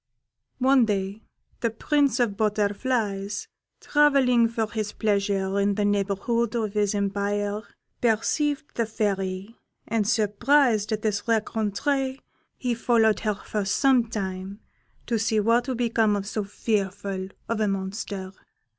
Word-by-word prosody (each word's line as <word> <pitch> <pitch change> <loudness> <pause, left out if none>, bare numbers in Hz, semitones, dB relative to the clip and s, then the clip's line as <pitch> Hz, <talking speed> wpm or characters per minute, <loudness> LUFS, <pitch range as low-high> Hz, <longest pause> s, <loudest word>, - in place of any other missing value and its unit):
One 260 -1 +4
day 200 0 -2 0.4
the 230 - +1
Prince 275 +3 +1
of 240 -3 +2
the - - -11
Butterflies, 205 -1 -1 0.3
travelling 275 -5 +4
for 225 -1 -2
his 215 -2 -3
pleasure 200 -2 0
in 200 0 +2
the 205 0 +1
neighbourhood 205 +4 0
of 215 -3 -1
his 210 -1 +1
empire, 205 +1 -1 0.4
perceived 285 +6 0
the 230 -2 -1
Fairy, 195 -1 -2 0.3
and 215 -2 0
surprised 225 +1 +2
at 215 -1 -2
this 205 -2 0
rencontre 230 +5 0 0.4
he 250 -2 -1
followed 225 -2 +3
her 215 -2 -1
for 210 +1 -3
some 245 +4 +3
time 195 -2 -5 0.5
to 230 -2 0
see 220 0 +1
what 230 +4 +2
would 255 -3 -2
become 225 -3 +2
of 200 -1 -3
so 210 0 -3
fearful 195 -2 -2 0.2
a 220 -2 0
monster. 195 0 -4
215 Hz, 130 wpm, -25 LUFS, 200-235 Hz, 0.5 s, One